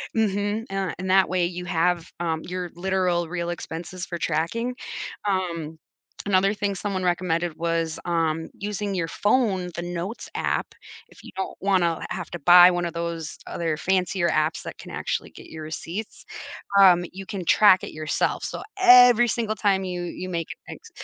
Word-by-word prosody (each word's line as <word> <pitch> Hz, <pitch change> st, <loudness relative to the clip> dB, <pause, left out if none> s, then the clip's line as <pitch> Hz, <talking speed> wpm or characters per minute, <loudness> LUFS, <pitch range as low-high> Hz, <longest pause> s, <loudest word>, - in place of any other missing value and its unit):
Mhm, 205 Hz, 0 st, 0 dB
uh, 195 Hz, -1 st, -2 dB
and 185 Hz, +1 st, -4 dB
that 190 Hz, 0 st, +4 dB
way, 180 Hz, -1 st, +1 dB
you 180 Hz, +1 st, -4 dB
have, 175 Hz, -1 st, 0 dB
um, 165 Hz, -2 st, -1 dB
your 180 Hz, -1 st, -5 dB
literal 180 Hz, -1 st, 0 dB
real 170 Hz, 0 st, -3 dB
expenses 175 Hz, +2 st, -6 dB
for 170 Hz, -, -5 dB
tracking. 170 Hz, +11 st, -1 dB, 0.5 s
Um, 170 Hz, -5 st, -2 dB, 0.5 s
another 195 Hz, 0 st, +3 dB
thing 205 Hz, -1 st, -2 dB
someone 190 Hz, -1 st, -3 dB
recommended 175 Hz, -2 st, 0 dB
was, 165 Hz, -1 st, -1 dB
um, 165 Hz, -2 st, -1 dB
using 205 Hz, 0 st, -4 dB
your 175 Hz, -3 st, -1 dB
phone, 205 Hz, -1 st, +1 dB
the 170 Hz, -, -3 dB
notes 175 Hz, +5 st, -5 dB
app. -, -, -2 dB, 0.3 s
If -, -, -18 dB
you -, -, -11 dB
don't 190 Hz, -, -4 dB
wanna 180 Hz, -4 st, +2 dB
h -, -, -5 dB
have 175 Hz, -5 st, -5 dB
to 175 Hz, -, -5 dB
buy 175 Hz, +3 st, +8 dB
one 175 Hz, 0 st, -1 dB
of 170 Hz, -, -4 dB
those 170 Hz, -2 st, -4 dB
other 165 Hz, -2 st, -2 dB
fancier 185 Hz, +1 st, +1 dB
apps 155 Hz, +1 st, 0 dB
that -, -, -8 dB
can -, -, -11 dB
actually -, -, -3 dB
get -, -, -13 dB
your 160 Hz, -1 st, -8 dB
receipts, 170 Hz, +7 st, -6 dB, 0.6 s
um, 180 Hz, -2 st, +7 dB
you 195 Hz, +1 st, -8 dB
can 195 Hz, -4 st, -5 dB
track 190 Hz, +1 st, +6 dB
it -, -, -6 dB
yourself. 155 Hz, -1 st, -1 dB
So, -, -, -5 dB, 0.2 s
every 245 Hz, -, +8 dB
single 220 Hz, -1 st, -1 dB
time 195 Hz, -2 st, +2 dB
you 180 Hz, -1 st, -4 dB
you 180 Hz, +1 st, -6 dB
make 170 Hz, -3 st, -3 dB, 0.2 s
an -, -, -7 dB
ex -, -, -16 dB
180 Hz, 175 wpm, -24 LUFS, 170-195 Hz, 0.6 s, buy